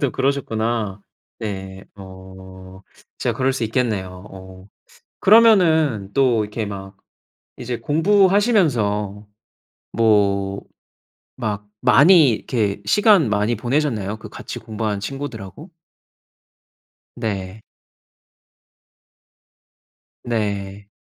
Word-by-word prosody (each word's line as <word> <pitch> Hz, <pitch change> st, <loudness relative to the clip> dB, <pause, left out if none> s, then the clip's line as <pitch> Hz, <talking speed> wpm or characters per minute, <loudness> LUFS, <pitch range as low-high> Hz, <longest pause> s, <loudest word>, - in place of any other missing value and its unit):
또 140 Hz, -4 st, +1 dB
그러셨구나. 115 Hz, -6 st, -2 dB, 0.4 s
네. 95 Hz, -2 st, -6 dB
어. 95 Hz, 0 st, -13 dB, 0.4 s
진짜 -, -, -1 dB
그럴 135 Hz, +1 st, +1 dB
수 130 Hz, -3 st, -2 dB
있겠네요. 105 Hz, -6 st, -2 dB
어. 95 Hz, 0 st, -13 dB, 0.5 s
그러면은 160 Hz, -, +4 dB
또 125 Hz, -6 st, +2 dB
이렇게 105 Hz, +1 st, -5 dB
막 95 Hz, -1 st, -8 dB, 0.6 s
이제 120 Hz, -1 st, -5 dB
공부하시면서 155 Hz, -, +1 dB, 0.7 s
뭐 100 Hz, -3 st, +1 dB, 0.8 s
막 105 Hz, -2 st, -4 dB
많이 145 Hz, +3 st, +6 dB
이렇게 105 Hz, -3 st, -2 dB
시간 195 Hz, -, +4 dB
많이 105 Hz, +3 st, +1 dB
보내셨나요 115 Hz, -4 st, -1 dB
그 110 Hz, -, -11 dB
같이 -, -, -8 dB
공부한 110 Hz, -2 st, -4 dB
친구들하고? 135 Hz, -, -7 dB, 1.5 s
네. 100 Hz, -1 st, -5 dB, 2.6 s
네. 100 Hz, -3 st, -3 dB
110 Hz, 185 characters per minute, -20 LUFS, 100-135 Hz, 2.6 s, 많이